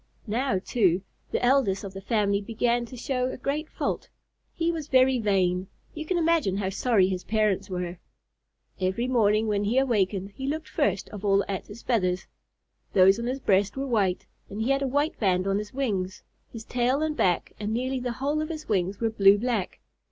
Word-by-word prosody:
Now, 230 -1 0
too, 185 -2 +1 0.3
the - - 0
eldest 245 -7 +2
of 195 -1 -7
the 195 - -7
family 200 -1 +1
began 235 +3 0
to 255 - -10
show 250 +1 -1
a - - -6
great 285 +4 -2
fault. - - -3 0.4
He 335 0 0
was 320 -3 -5
very 260 -1 +4
vain. 190 -3 +1 0.3
You 310 0 -6
can 365 - +1
imagine 325 - +2
how 195 -2 -1
sorry 205 -2 +3
his 185 -1 -3
parents 210 -2 0
were. 180 -1 -4 0.8
Every 190 +6 0
morning 220 -3 +3
when 205 -2 0
he 225 +5 +1
awakened 205 -7 +1
he 265 +7 -6
looked 315 +2 -3
first 200 0 0
of 210 -1 -9
all 200 -1 +3
at 195 -2 -4
his 215 +3 -11
feathers. 185 -7 0 0.7
Those 195 +2 +6
on 235 - -3
his 265 +2 -3
breast 195 +3 +2
were 270 - -2
white, 205 -8 0 0.2
and 200 - -6
he 255 - +1
had 275 0 +2
a 275 - 0
white 290 +4 0
band 185 -3 +2
on 195 +1 +1
his 210 0 -6
wings. 200 -8 -2 0.3
His 225 -2 -8
tail 250 +4 +1
and 310 -1 -1
back 180 - +1
and 210 0 -3
nearly 255 +3 -1
the 245 -1 -3
whole 285 +5 -1
of 310 - -3
his 310 -2 -6
wings 190 -1 0
were 225 -1 0
blue 200 -2 +6
black. 225 -4 -2
220 Hz, 200 wpm, -26 LUFS, 195-260 Hz, 0.8 s, Those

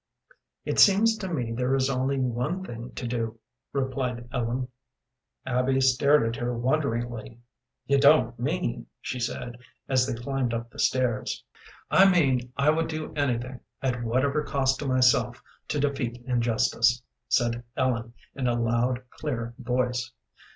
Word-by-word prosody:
"It - - -1
seems 215 +3 +6
to 190 -4 -5
me 125 -8 -2
there 125 +3 0
is 135 -1 +2
only 135 +1 0
one 130 +9 -1
thing 120 -2 -7
to 125 - -5
do," 115 -2 -3 0.3
replied 130 -3 -2
Ellen. 125 +2 -1 0.8
Abby 130 +1 +1
stared 135 +2 +4
at 115 +1 -2
her 120 0 -1
wonderingly. 120 -3 -1 0.5
"You 140 +2 +3
don't 140 -4 +5
mean 145 +1 -2
" - - -58
she 125 - -4
said, 120 0 -4 0.3
as 130 -1 +2
they 130 - -2
climbed 125 -1 -1
up 115 0 -5
the - - -13
stairs. 125 -4 0 0.5
"I 195 +1 +7
mean 130 -9 +2
I 140 +2 +4
would 165 +1 0
do 155 -1 -5
anything, 130 -3 -1 0.2
at 125 -2 -1
whatever 130 +6 +1
cost 135 -2 +1
to 145 - -3
myself, 125 -2 +3 0.3
to 150 - -1
defeat 130 -4 -2
injustice," 120 -1 +2 0.3
said 120 -1 +1
Ellen, 120 -3 -1 0.2
in 130 -2 -2
a 120 0 +1
loud, 120 +2 0
clear 120 -6 -4
voice. 125 0 -1
125 Hz, 150 wpm, -27 LUFS, 120-140 Hz, 0.8 s, I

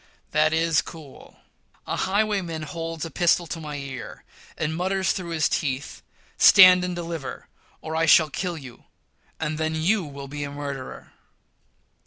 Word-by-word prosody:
That 155 +1 +3
is 160 -1 +2
cool. 155 -5 -13 0.4
A - - -3
highwayman 190 -5 -1
holds 165 0 -5
a 165 - -7
pistol 175 +3 +2
to 165 - -6
my 150 -2 -6
ear, 135 -5 -8 0.3
and 160 0 -2
mutters 190 +2 0
through 180 -3 -4
his 160 -3 +1
teeth, 140 0 -3 0.4
"stand 185 -2 +8
and 180 -1 -3
deliver, 165 -4 -6 0.3
or 160 0 -5
I 165 0 +1
shall 155 -1 +6
kill 180 0 -3
you, 130 -5 -12 0.5
and 155 -1 -3
then 160 0 -1
you'll 160 -5 -1
be 145 +1 -5
a 145 - -4
murderer!" 140 -2 -7
160 Hz, 150 wpm, -24 LUFS, 145-175 Hz, 0.5 s, stand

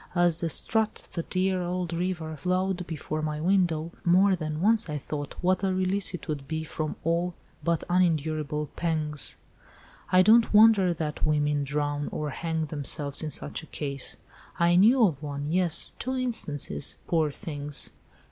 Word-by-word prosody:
As 175 -2 +3
the 165 - 0
Sturt, 220 +6 0
that 170 - -4
dear 185 0 +1
old 175 -1 -2
river, 170 -2 -2
flowed 185 +2 -1
before 155 -1 -4
my 155 -1 -2
window, 170 -2 +1
more 185 +3 +5
than 155 -3 -4
once 215 +1 +3
I 150 - -2
thought 145 0 -5
what 185 +1 +2
a 190 - +2
release 185 0 0
it 180 - -9
would 145 -3 -4
be 160 0 -3
from 155 -1 -4
all 170 +2 0 0.3
but 170 -1 0
unendurable 155 -4 0
pangs. 155 -4 -1 0.7
I 185 0 +6
don't 225 +1 +5
wonder 210 -4 +7
that 155 -3 -3
women 150 -1 +1
drown 145 +1 -2
or 150 -1 -3
hang 160 +1 -2
themselves 145 -1 -1
in 155 - -3
such 145 +2 -3
a 160 - -13
case. 140 -3 -4 0.4
I 170 0 +4
knew 225 +6 +6
of 155 -8 -1
one—yes—two 160 - -1
instances—poor 160 - -1
things!" 145 -4 -4
165 Hz, 150 wpm, -27 LUFS, 150-185 Hz, 0.7 s, wonder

